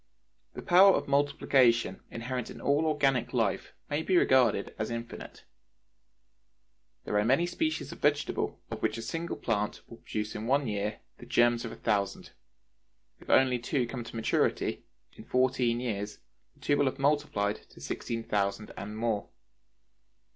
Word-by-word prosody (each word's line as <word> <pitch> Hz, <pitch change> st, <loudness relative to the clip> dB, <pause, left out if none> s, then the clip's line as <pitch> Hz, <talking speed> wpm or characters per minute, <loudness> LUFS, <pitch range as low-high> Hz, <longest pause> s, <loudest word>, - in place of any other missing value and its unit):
The -, -, -7 dB
power 190 Hz, +2 st, +7 dB
of -, -, -2 dB
multiplication 135 Hz, -6 st, +2 dB
inherent 125 Hz, +1 st, -4 dB
in -, -, -9 dB
all 145 Hz, +3 st, +2 dB
organic 135 Hz, -5 st, +1 dB
life -, -, 0 dB, 0.2 s
may 145 Hz, +2 st, -1 dB
be 185 Hz, +2 st, +2 dB
regarded 130 Hz, -9 st, +3 dB
as 110 Hz, -, -2 dB
infinite. 115 Hz, 0 st, -7 dB, 1.6 s
There 105 Hz, -, 0 dB
are -, -, +2 dB
many 130 Hz, +10 st, +3 dB
species 160 Hz, -2 st, -2 dB
of -, -, -10 dB
vegetables 145 Hz, 0 st, 0 dB
of -, -, -5 dB
which 110 Hz, -, 0 dB
a 115 Hz, -, -5 dB
single 165 Hz, +6 st, -3 dB
plant 105 Hz, -3 st, -2 dB
will 115 Hz, -, -12 dB
produce 105 Hz, -1 st, -4 dB
in 110 Hz, +1 st, -5 dB
one 140 Hz, +2 st, +2 dB
year 105 Hz, 0 st, -3 dB, 0.2 s
the -, -, -11 dB
germs 120 Hz, 0 st, +3 dB
of 115 Hz, -, -5 dB
a -, -, -8 dB
thousand; 100 Hz, -3 st, -1 dB, 0.9 s
if -, -, -15 dB
only 130 Hz, -2 st, +4 dB
two 125 Hz, +1 st, 0 dB
come 120 Hz, 0 st, -5 dB
to 115 Hz, -, -10 dB
maturity, 115 Hz, -, 0 dB, 0.3 s
in -, -, -12 dB
fourteen 125 Hz, -2 st, +1 dB
years 105 Hz, -4 st, -3 dB, 0.4 s
the -, -, -26 dB
two 145 Hz, -, +2 dB
will 145 Hz, -, +3 dB
have 135 Hz, 0 st, -1 dB
multiplied 140 Hz, -8 st, +1 dB
to -, -, -16 dB
sixteen 115 Hz, -1 st, -4 dB
thousand 100 Hz, 0 st, -1 dB
and 105 Hz, +2 st, -6 dB
more. 110 Hz, -3 st, -1 dB
120 Hz, 160 wpm, -29 LUFS, 110-140 Hz, 1.6 s, power